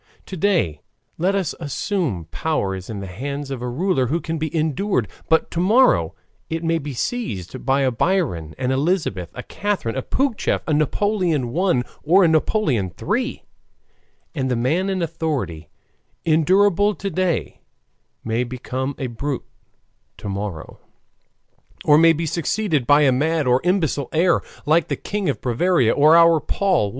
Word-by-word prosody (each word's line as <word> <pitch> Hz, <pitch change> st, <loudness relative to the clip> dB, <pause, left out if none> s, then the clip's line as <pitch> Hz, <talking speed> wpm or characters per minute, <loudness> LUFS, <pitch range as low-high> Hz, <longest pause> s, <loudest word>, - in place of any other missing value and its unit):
To 190 Hz, -, -7 dB
day, 170 Hz, -, +1 dB, 0.4 s
let 190 Hz, +4 st, +1 dB
us 190 Hz, -5 st, -1 dB
assume, 145 Hz, -, -2 dB
power 100 Hz, -, -1 dB
is 95 Hz, -1 st, -7 dB
in 105 Hz, -3 st, -5 dB
the -, -, -5 dB
hands 140 Hz, +9 st, -5 dB
of 130 Hz, -3 st, -4 dB
a 125 Hz, -, -3 dB
ruler 135 Hz, -1 st, 0 dB
who 160 Hz, +7 st, 0 dB
can 165 Hz, -1 st, -4 dB
be 155 Hz, 0 st, -2 dB
endured, 155 Hz, -, 0 dB, 0.2 s
but 160 Hz, 0 st, +2 dB
to 170 Hz, -, -2 dB
morrow 180 Hz, -, +3 dB, 0.3 s
it 165 Hz, +1 st, -3 dB
may 165 Hz, 0 st, +1 dB
be 145 Hz, -1 st, -6 dB
seized 130 Hz, -, -4 dB
by 135 Hz, +1 st, +3 dB
a 130 Hz, -1 st, +2 dB
Biron, 115 Hz, -, -1 dB
an 125 Hz, -, -1 dB
Elizabeth, 135 Hz, -, 0 dB
a 125 Hz, -, -6 dB
Catherine, 200 Hz, -, -2 dB
a 130 Hz, -, -1 dB
Pougachef, 265 Hz, -, 0 dB
a 155 Hz, -, 0 dB
Napoleon 155 Hz, -, 0 dB
I., 175 Hz, -8 st, +2 dB, 0.2 s
or 185 Hz, +6 st, +4 dB
a -, -, +5 dB
Napoleon 155 Hz, -, +1 dB
III. 245 Hz, -, -2 dB, 0.9 s
And 130 Hz, -5 st, -2 dB
the 125 Hz, -, +1 dB
man 155 Hz, +11 st, 0 dB
in 190 Hz, -2 st, -1 dB
authority, 145 Hz, -, -3 dB, 0.6 s
endurable 195 Hz, +5 st, +3 dB
to 195 Hz, 0 st, -4 dB
day, 180 Hz, -1 st, -1 dB, 0.6 s
may 115 Hz, +2 st, 0 dB
become 130 Hz, +2 st, -4 dB
a 135 Hz, -, -3 dB
brute 130 Hz, +3 st, -4 dB, 0.7 s
to -, -, -8 dB
morrow, 100 Hz, -4 st, -5 dB, 1.1 s
or 150 Hz, 0 st, +6 dB
may 165 Hz, 0 st, +6 dB
be 165 Hz, +1 st, -3 dB
succeeded 165 Hz, -, -1 dB
by 145 Hz, +1 st, +6 dB
a 135 Hz, -, +5 dB
mad 155 Hz, +4 st, +1 dB
or 125 Hz, +1 st, +3 dB
imbecile 165 Hz, -7 st, 0 dB
heir, 170 Hz, +3 st, +3 dB, 0.2 s
like 155 Hz, +3 st, +3 dB
the -, -, -1 dB
King 205 Hz, -4 st, -3 dB
of 140 Hz, -, -2 dB
Bavaria 125 Hz, 0 st, +2 dB
or 155 Hz, +3 st, +5 dB
our 165 Hz, -1 st, +6 dB
Paul 185 Hz, -, +1 dB
I. -, -, -5 dB
155 Hz, 160 wpm, -21 LUFS, 125-180 Hz, 1.1 s, or